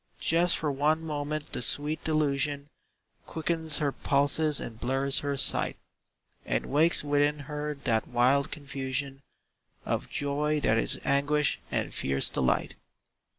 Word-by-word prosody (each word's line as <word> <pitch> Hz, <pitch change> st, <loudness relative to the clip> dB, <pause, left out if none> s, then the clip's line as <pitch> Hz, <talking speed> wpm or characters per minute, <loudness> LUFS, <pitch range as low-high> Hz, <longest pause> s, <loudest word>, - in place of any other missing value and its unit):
Just 170 Hz, +1 st, +2 dB
for 150 Hz, -2 st, -1 dB
one 155 Hz, +4 st, 0 dB
moment 150 Hz, 0 st, -4 dB
the -, -, -4 dB
sweet 145 Hz, +6 st, 0 dB
delusion 145 Hz, -2 st, 0 dB, 0.6 s
Quickens 160 Hz, -1 st, +1 dB
her 145 Hz, -2 st, 0 dB
pulses 145 Hz, +2 st, +1 dB
and 115 Hz, -1 st, -8 dB
blurs 135 Hz, +3 st, +2 dB
her 140 Hz, -1 st, -3 dB
sight, -, -, +1 dB, 0.7 s
And -, -, -2 dB
wakes 155 Hz, +4 st, +3 dB
within 145 Hz, 0 st, +1 dB
her 150 Hz, +1 st, -4 dB
that 115 Hz, -4 st, 0 dB
wild 125 Hz, +3 st, +2 dB
confusion 135 Hz, -1 st, -4 dB, 0.6 s
Of -, -, -2 dB
joy 150 Hz, +2 st, -1 dB
that 110 Hz, -3 st, +2 dB
is -, -, +2 dB
anguish 140 Hz, +1 st, +1 dB
and -, -, -2 dB
fierce 70 Hz, 0 st, +1 dB
delight. 65 Hz, -, 0 dB
145 Hz, 130 wpm, -28 LUFS, 135-150 Hz, 0.7 s, wakes